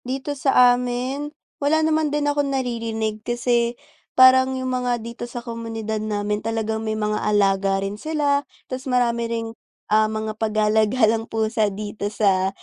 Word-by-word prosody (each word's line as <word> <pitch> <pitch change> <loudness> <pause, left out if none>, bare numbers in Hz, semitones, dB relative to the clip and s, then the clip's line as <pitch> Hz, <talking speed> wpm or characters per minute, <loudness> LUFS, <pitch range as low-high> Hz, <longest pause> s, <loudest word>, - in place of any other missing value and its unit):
Dito 265 +3 -3
sa 265 -3 +5
amin, 250 +4 -3 0.3
wala 315 +2 +2
naman 315 -1 +1
din 295 0 -1
akong 290 -1 +1
naririnig 230 -5 -2
kasi 240 0 0 0.4
parang 260 0 +6
yung 260 0 -2
mga 250 -1 0
dito 235 +1 -7
sa 240 0 -7
komunidad 225 -2 -4
namin 210 -1 -2
talagang 220 0 -2
may 220 -1 -2
mga 210 0 -1
alaga 195 -2 +2
rin 205 +2 -6
sila, 295 -2 +1 0.2
tas 260 +1 -6
marami 235 -2 +1
rin, 230 -1 -2 0.5
ah, 215 0 +4
mga 215 0 -3
pagala-galang 220 +1 +2
pusa 220 -1 0
dito 205 0 -5
sa 195 -3 +2
230 Hz, 145 wpm, -22 LUFS, 215-255 Hz, 0.5 s, parang